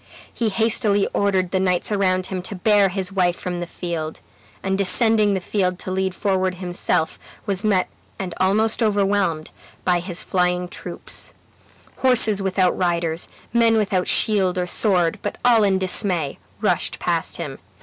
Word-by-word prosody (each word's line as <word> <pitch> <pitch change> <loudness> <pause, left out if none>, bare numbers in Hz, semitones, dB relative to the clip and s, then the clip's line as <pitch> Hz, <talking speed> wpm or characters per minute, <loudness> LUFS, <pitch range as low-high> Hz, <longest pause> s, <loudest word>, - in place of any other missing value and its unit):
He 230 -2 0
hastily 215 -2 +1
ordered 190 -3 +1
the 190 - +1
knights 185 +1 0
around 185 -2 +1
him 185 -1 -4
to 195 +3 -4
bear 205 0 +3
his 190 0 -3
wife 180 -3 +1
from 180 -2 -4
the 175 - -4
field; 165 -3 -5 0.4
and 190 0 0
descending 205 +2 +2
the - - 0
field 185 -1 -1
to 185 - -6
lead 190 0 -1
forward 190 -2 0
himself, 175 -3 -1 0.3
was 200 -1 0
met 200 -4 +2 0.3
and 185 -3 -4
almost 215 +5 +2
overwhelmed 200 -6 +1 0.3
by 180 -1 +3
his 175 0 -3
flying 180 -1 0
troops; - - -5 0.6
horses 225 -6 +3
without 190 -1 +1
riders, 170 -2 -1 0.3
men 230 -1 +4
without 195 -4 0
shield 190 -4 +3
or 180 - 0
sword, 180 -3 +1
but - - -3
all 235 -3 +5
in 195 -2 +3
dismay, 180 -5 -1 0.2
rushed - - 0
past - - -2
him. - - -6
190 Hz, 155 wpm, -22 LUFS, 180-205 Hz, 0.6 s, all